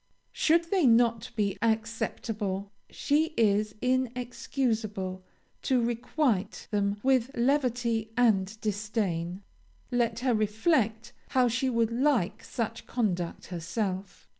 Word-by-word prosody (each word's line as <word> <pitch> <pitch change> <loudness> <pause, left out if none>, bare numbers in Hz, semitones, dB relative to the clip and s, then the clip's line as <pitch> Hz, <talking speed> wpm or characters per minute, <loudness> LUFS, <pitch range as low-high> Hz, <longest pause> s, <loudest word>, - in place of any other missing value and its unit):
"Should 335 +1 +2
they 370 -8 +4
not 235 0 +3
be 200 -3 0
acceptable, 220 -3 -2 0.2
she 310 +2 0
is 210 -1 +2
inexcusable 240 -6 -1 0.4
to 260 -2 +2
requite 235 -2 -1
them 200 -1 +1
with 260 -2 +3
levity 240 -3 +1
and 215 -3 +2
disdain. 200 -4 -2 0.5
Let 235 -1 0
her 255 -1 +2
reflect 220 +1 +1 0.2
how 255 -1 +3
she 260 +3 0
would 230 -2 +1
like 245 -6 +1
such 230 -3 -4
conduct 180 -8 -2
herself. 190 +3 -4
230 Hz, 105 wpm, -28 LUFS, 205-250 Hz, 0.5 s, they